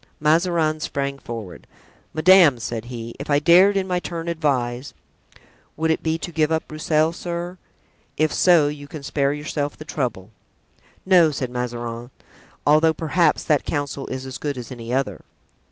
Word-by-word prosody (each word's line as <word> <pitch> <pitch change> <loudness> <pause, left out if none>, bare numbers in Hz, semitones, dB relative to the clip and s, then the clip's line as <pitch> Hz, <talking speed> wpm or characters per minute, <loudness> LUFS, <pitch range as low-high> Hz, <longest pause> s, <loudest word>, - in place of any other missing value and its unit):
Mazarin 160 0 +2
sprang 140 -2 -3
forward. 95 - -8 0.4
"Madame," 170 -4 +6
said 115 0 -5
he, 120 -1 -7
"if 140 - -7
I 145 - +4
dared 180 +6 +5
in 190 -1 -1
my 180 -1 0
turn 170 -1 -6
advise——" 130 -5 -1 0.8
"Would 160 +1 +1
it 160 - 0
be 160 0 0
to 175 - -6
give 155 -1 +1
up 160 0 -1
Broussel, 155 +1 +1
sir? 175 +1 -5 0.6
If 155 -1 +1
so, 170 -5 +5
you 145 -1 -6
can 150 -1 -9
spare 140 0 0
yourself 145 0 -3
the 155 - -10
trouble." 115 -10 -3 0.7
"No," 180 -4 +6
said 130 -4 -4
Mazarin; 120 -1 -4 0.6
"although, 155 +2 +4
perhaps, 165 0 +1
that 150 -3 +2
counsel 140 -2 -3
is 130 0 -5
as 130 0 -7
good 145 -3 -3
as 125 -1 -8
any 120 -2 -7
other." 125 - -1
150 Hz, 160 wpm, -22 LUFS, 130-160 Hz, 0.8 s, Madame